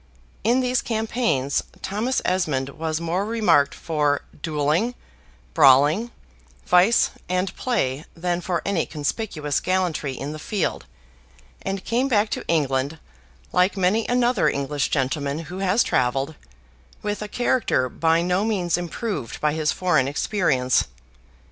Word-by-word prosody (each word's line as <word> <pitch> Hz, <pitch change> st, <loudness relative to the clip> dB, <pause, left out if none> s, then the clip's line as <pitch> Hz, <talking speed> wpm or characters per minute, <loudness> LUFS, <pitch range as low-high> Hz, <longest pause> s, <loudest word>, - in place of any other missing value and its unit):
In 240 Hz, +5 st, +3 dB
these 250 Hz, 0 st, +1 dB
campaigns 220 Hz, -, 0 dB, 0.2 s
Thomas 220 Hz, +7 st, -1 dB
Esmond 150 Hz, -8 st, 0 dB
was 155 Hz, +2 st, -3 dB
more 170 Hz, +3 st, -1 dB
remarked 210 Hz, -10 st, +2 dB
for 150 Hz, -3 st, 0 dB, 0.2 s
duelling, 155 Hz, +10 st, 0 dB, 0.6 s
brawling, 145 Hz, -, +5 dB, 0.6 s
vice, 180 Hz, +6 st, +4 dB, 0.2 s
and 185 Hz, +1 st, -1 dB
play, 155 Hz, -, -1 dB
than 175 Hz, +1 st, -1 dB
for 175 Hz, -1 st, -2 dB
any 195 Hz, -5 st, 0 dB
conspicuous 150 Hz, -1 st, -2 dB
gallantry 180 Hz, -7 st, -1 dB
in 140 Hz, +3 st, -5 dB
the 155 Hz, -, -7 dB
field, 195 Hz, +3 st, -2 dB, 0.7 s
and 195 Hz, 0 st, -4 dB
came 245 Hz, +3 st, +1 dB
back 215 Hz, -4 st, +2 dB
to -, -, -4 dB
England, 140 Hz, -2 st, 0 dB, 0.5 s
like 185 Hz, +2 st, +2 dB
many 195 Hz, +4 st, +2 dB
another 245 Hz, 0 st, +2 dB
English 140 Hz, +1 st, -1 dB
gentleman 140 Hz, +1 st, -1 dB
who 165 Hz, +3 st, -7 dB
has 195 Hz, +4 st, +3 dB
travelled, 135 Hz, +4 st, 0 dB, 0.7 s
with 210 Hz, 0 st, -2 dB
a 210 Hz, -, -4 dB
character 240 Hz, -, +1 dB
by 165 Hz, +5 st, +1 dB
no 180 Hz, +3 st, +1 dB
means 185 Hz, -6 st, 0 dB
improved 175 Hz, -, -4 dB
by 150 Hz, -1 st, +1 dB
his 155 Hz, -1 st, +1 dB
foreign 155 Hz, -8 st, +2 dB
experience. 140 Hz, -5 st, +1 dB
175 Hz, 130 wpm, -23 LUFS, 145-210 Hz, 0.7 s, brawling